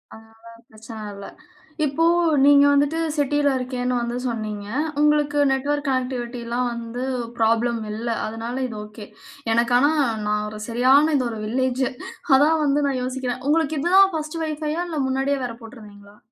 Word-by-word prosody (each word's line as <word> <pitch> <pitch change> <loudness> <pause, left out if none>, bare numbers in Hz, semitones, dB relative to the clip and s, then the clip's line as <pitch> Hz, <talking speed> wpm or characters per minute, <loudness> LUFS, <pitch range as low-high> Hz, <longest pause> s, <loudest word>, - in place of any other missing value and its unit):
அதனால 225 +1 -18 0.2
பிரச்சன 220 +1 -11 0.2
இல்ல. 200 0 -9 0.6
இப்போ 295 +3 0 0.4
நீங்க 285 0 +7
வந்துட்டு 285 +3 +2 0.2
சிட்டில 290 0 +2
இருக்கேன்னு 250 0 -2
வந்து 240 0 -3
சொன்னீங்க. 215 -3 -4 0.4
உங்களுக்கு 295 -1 +2
நெட்வொர்க் 285 +2 -1
கனெக்டிவிட்டி 250 -2 -2
லாம் 245 0 0
வந்து 235 +1 -6 0.3
ப்ராப்ளம் 230 +1 +1
இல்ல. 225 +3 -4 0.2
அதனால 225 +2 -5
இது 230 - -8
ஒகே. 210 0 -11 0.5
எனக்கு 235 +1 +2
ஆனா 285 +4 +4 0.3
நான் 210 0 0
ஒரு 215 0 -9
சரியான 265 +6 +4
இது 255 - 0
ஒரு 225 -2 -6
வில்லேஜ். 255 +3 0 0.5
அதான் 310 +3 +3
வந்து 285 +1 +2
நான் 265 -2 -1
யோசிக்கிறேன். 255 -1 -4
உங்களுக்கு 315 0 +1
இது 340 - -1
தான் 390 0 +6
ஃபர்ஸ்ட் 310 +1 -4
வைஃபை 305 -1 -3
ஆ - - -1
இல்ல 315 -3 -3
முன்னாடியே 270 +1 0
வேற 235 -2 -6
போட்டுருந்தீங்களா? 210 -3 -14
255 Hz, 155 wpm, -22 LUFS, 230-290 Hz, 0.6 s, நீங்க